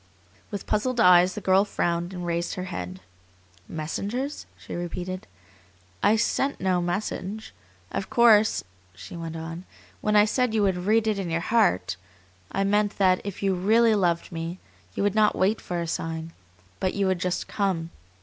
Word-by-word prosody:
With 200 Hz, -2 st, -5 dB
puzzled 240 Hz, +4 st, 0 dB
eyes 180 Hz, -2 st, +6 dB
the 210 Hz, -, -5 dB
girl 190 Hz, +1 st, +4 dB
frowned 175 Hz, -3 st, -1 dB
and 180 Hz, -2 st, -5 dB
raised 170 Hz, 0 st, -2 dB
her 185 Hz, -, -4 dB
head. 90 Hz, -, -6 dB, 0.7 s
"Messengers?" 205 Hz, -, -4 dB
she -, -, -10 dB
repeated. 175 Hz, +2 st, -5 dB, 0.7 s
"I 210 Hz, -, +4 dB
sent 270 Hz, +5 st, 0 dB
no 185 Hz, -1 st, +1 dB
message. 195 Hz, +3 st, -3 dB, 0.4 s
Of 195 Hz, -, -3 dB
course," 220 Hz, -3 st, +5 dB, 0.3 s
she 95 Hz, -, -10 dB
went 165 Hz, -1 st, -6 dB
on, 165 Hz, +2 st, -6 dB, 0.4 s
"when 210 Hz, 0 st, +1 dB
I 210 Hz, 0 st, +7 dB
said 240 Hz, +1 st, 0 dB
you 215 Hz, -, +3 dB
would 185 Hz, -1 st, 0 dB
'read 220 Hz, +1 st, +4 dB
it 215 Hz, -2 st, 0 dB
in 185 Hz, -3 st, -3 dB
your 165 Hz, +1 st, 0 dB
heart' 195 Hz, -, +1 dB, 0.5 s
I 195 Hz, -, 0 dB
meant 205 Hz, +1 st, +1 dB
that 185 Hz, -2 st, +3 dB
if 200 Hz, -1 st, -6 dB
you 195 Hz, -1 st, +2 dB
REALLY 220 Hz, +5 st, +4 dB
loved 175 Hz, -5 st, +1 dB
me 165 Hz, +1 st, -4 dB, 0.4 s
you -, -, -1 dB
would 205 Hz, -1 st, +2 dB
not 215 Hz, 0 st, +3 dB
wait 200 Hz, +4 st, +2 dB
for 175 Hz, -1 st, -3 dB
a 170 Hz, -, -2 dB
sign, 165 Hz, 0 st, -4 dB, 0.5 s
but 185 Hz, -, -1 dB
you 200 Hz, -1 st, +1 dB
would 185 Hz, -2 st, +1 dB
just 180 Hz, 0 st, -2 dB
COME!" 180 Hz, -5 st, -1 dB
185 Hz, 170 wpm, -26 LUFS, 175-210 Hz, 0.7 s, I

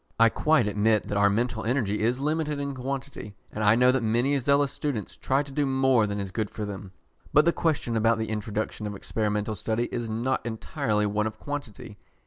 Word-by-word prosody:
I 115 Hz, 0 st, +7 dB
quite 155 Hz, 0 st, +2 dB
admit 105 Hz, +1 st, +2 dB
that 105 Hz, -, -1 dB
our 100 Hz, 0 st, +5 dB
mental 110 Hz, +2 st, -1 dB
energy 110 Hz, -4 st, 0 dB
is 120 Hz, +4 st, +1 dB
limited 150 Hz, +1 st, -1 dB
in 140 Hz, 0 st, -3 dB
quantity, 130 Hz, -5 st, -5 dB, 0.2 s
and 110 Hz, -, -3 dB
I 105 Hz, +1 st, +6 dB
know 125 Hz, +1 st, +5 dB
that 130 Hz, -1 st, +1 dB
many 120 Hz, +5 st, +1 dB
zealous 140 Hz, +2 st, +2 dB
students 130 Hz, -9 st, -4 dB
try 135 Hz, +2 st, 0 dB
to 140 Hz, -, -11 dB
do 145 Hz, +1 st, 0 dB
more 130 Hz, -4 st, +3 dB
than 100 Hz, 0 st, -3 dB
is 100 Hz, -1 st, -4 dB
good 110 Hz, 0 st, -2 dB
for 105 Hz, -, -5 dB
them. 100 Hz, -1 st, -7 dB, 0.4 s
But 150 Hz, +2 st, +6 dB
the 170 Hz, -, +4 dB
question 145 Hz, -8 st, 0 dB
about 115 Hz, 0 st, +3 dB
the 110 Hz, -1 st, -3 dB
introduction 105 Hz, 0 st, -3 dB
of 105 Hz, -, -5 dB
experimental 105 Hz, +1 st, -2 dB
study 110 Hz, +4 st, -1 dB
is 120 Hz, -2 st, -3 dB
not 120 Hz, +4 st, -1 dB
entirely 110 Hz, -1 st, -1 dB
one 105 Hz, +1 st, 0 dB
of 110 Hz, 0 st, -7 dB
quantity. 130 Hz, -7 st, -7 dB
115 Hz, 205 wpm, -26 LUFS, 105-135 Hz, 0.4 s, I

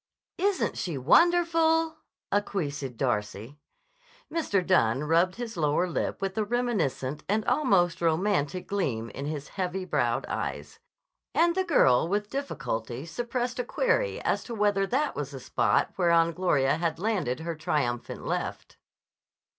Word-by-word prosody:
"Isn't 395 Hz, +1 st, 0 dB
she 170 Hz, -6 st, -3 dB
wonderful!" 325 Hz, -, +3 dB, 0.3 s
acquiesced 150 Hz, -, -2 dB
Darcy. 115 Hz, +2 st, -2 dB, 0.7 s
Mr. 205 Hz, -, 0 dB
Dunne 135 Hz, -8 st, +3 dB
rubbed 170 Hz, +4 st, +2 dB
his 235 Hz, -2 st, -6 dB
lower 155 Hz, +2 st, +1 dB
lip 180 Hz, +3 st, -3 dB
with 195 Hz, -1 st, -2 dB
a -, -, +2 dB
reminiscent 205 Hz, -, -1 dB
and 215 Hz, +1 st, +1 dB
almost 190 Hz, -, +2 dB
romantic 170 Hz, 0 st, +1 dB
gleam 120 Hz, -, -2 dB
in 140 Hz, +5 st, -5 dB
his 150 Hz, -2 st, -5 dB
heavy 185 Hz, -1 st, -3 dB
browed -, -, 0 dB
eyes, 450 Hz, -, -5 dB, 0.6 s
and 340 Hz, 0 st, +4 dB
the 375 Hz, +1 st, +1 dB
girl 160 Hz, -, +4 dB
with 205 Hz, +3 st, -1 dB
difficulty 130 Hz, -, -4 dB
suppressed 240 Hz, +6 st, -3 dB
a -, -, +1 dB
query -, -, 0 dB
as -, -, 0 dB
to 235 Hz, -, -5 dB
whether 205 Hz, -2 st, +2 dB
that 280 Hz, +7 st, 0 dB
was 145 Hz, -2 st, -3 dB
the 135 Hz, -2 st, -8 dB
spot -, -, +1 dB
whereon 170 Hz, -2 st, +4 dB
Gloria 150 Hz, -6 st, +2 dB
had 165 Hz, -1 st, -1 dB
landed 180 Hz, -, -1 dB
her 170 Hz, +1 st, -3 dB
triumphant 150 Hz, -7 st, -2 dB
left. -, -, -4 dB
180 Hz, 140 wpm, -27 LUFS, 145-240 Hz, 0.7 s, and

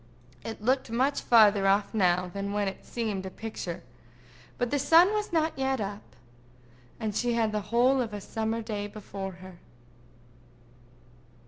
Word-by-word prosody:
It 225 Hz, -1 st, -7 dB
looked 260 Hz, +2 st, +1 dB
much 260 Hz, +5 st, +1 dB
further 210 Hz, -4 st, +5 dB
off 200 Hz, +2 st, +2 dB
now 180 Hz, -3 st, +2 dB
than 200 Hz, 0 st, -3 dB
when 205 Hz, -1 st, 0 dB
it 195 Hz, -, -6 dB
seemed 215 Hz, -5 st, -3 dB
a -, -, -4 dB
picture, 200 Hz, -4 st, -6 dB, 0.7 s
but 245 Hz, -1 st, -1 dB
the 285 Hz, -, +1 dB
sun 330 Hz, +8 st, +6 dB
was 420 Hz, -2 st, -2 dB
not 320 Hz, -1 st, +1 dB
yet 265 Hz, -1 st, 0 dB
up, 205 Hz, 0 st, -6 dB, 0.8 s
and 215 Hz, -3 st, -3 dB
she 240 Hz, +2 st, +1 dB
had 225 Hz, -2 st, +1 dB
the 210 Hz, 0 st, -1 dB
whole 255 Hz, +3 st, +3 dB
of 230 Hz, -3 st, -3 dB
a 205 Hz, -, -5 dB
summer 225 Hz, +2 st, -3 dB
day 210 Hz, -2 st, -4 dB
before 195 Hz, -2 st, -7 dB
her. 185 Hz, -1 st, -13 dB
220 Hz, 155 wpm, -28 LUFS, 200-245 Hz, 0.8 s, sun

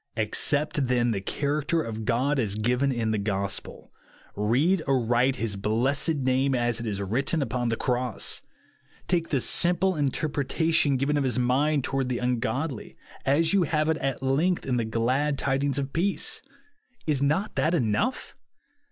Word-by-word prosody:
Accept, 145 Hz, +6 st, +1 dB
then, 120 Hz, -1 st, +2 dB
the 100 Hz, -3 st, -2 dB
character 150 Hz, -, -1 dB
of 110 Hz, -1 st, -5 dB
God 135 Hz, +5 st, +1 dB
as 105 Hz, -5 st, 0 dB
given 125 Hz, +5 st, +1 dB
in 115 Hz, -3 st, -1 dB
the 110 Hz, -, 0 dB
gospel; 100 Hz, -1 st, -3 dB, 0.4 s
read 135 Hz, -, +2 dB
aright 125 Hz, 0 st, +2 dB
his 115 Hz, -5 st, -2 dB
blessed 125 Hz, +10 st, 0 dB
name 130 Hz, 0 st, +1 dB
as 120 Hz, -1 st, 0 dB
it 115 Hz, -, -4 dB
is 100 Hz, -2 st, -2 dB
written 125 Hz, -, 0 dB
upon 120 Hz, 0 st, -2 dB
the 115 Hz, -, 0 dB
cross; 125 Hz, -1 st, -1 dB, 0.7 s
take 170 Hz, -2 st, 0 dB
the 140 Hz, -, +1 dB
simple 175 Hz, +7 st, +2 dB
interpretation 145 Hz, +1 st, +1 dB
given 140 Hz, +3 st, 0 dB
of 145 Hz, -, +1 dB
his 125 Hz, -3 st, 0 dB
mind 135 Hz, +4 st, +2 dB
toward 135 Hz, -1 st, -1 dB
the 125 Hz, -, -1 dB
ungodly, 125 Hz, -, -2 dB, 0.3 s
as 160 Hz, +6 st, +3 dB
you 200 Hz, -, +4 dB
have 155 Hz, -1 st, +1 dB
it 160 Hz, -, +1 dB
at 135 Hz, -3 st, -3 dB
length 155 Hz, +7 st, +1 dB
in 125 Hz, -2 st, 0 dB
the 115 Hz, -, 0 dB
glad 130 Hz, +6 st, 0 dB
tidings 140 Hz, 0 st, 0 dB
of 140 Hz, -1 st, -3 dB
peace. 190 Hz, +4 st, -1 dB, 0.6 s
Is 145 Hz, -4 st, 0 dB
not 155 Hz, +9 st, +1 dB
that 165 Hz, +3 st, +2 dB
enough 150 Hz, -, -1 dB
135 Hz, 160 wpm, -26 LUFS, 120-150 Hz, 0.7 s, you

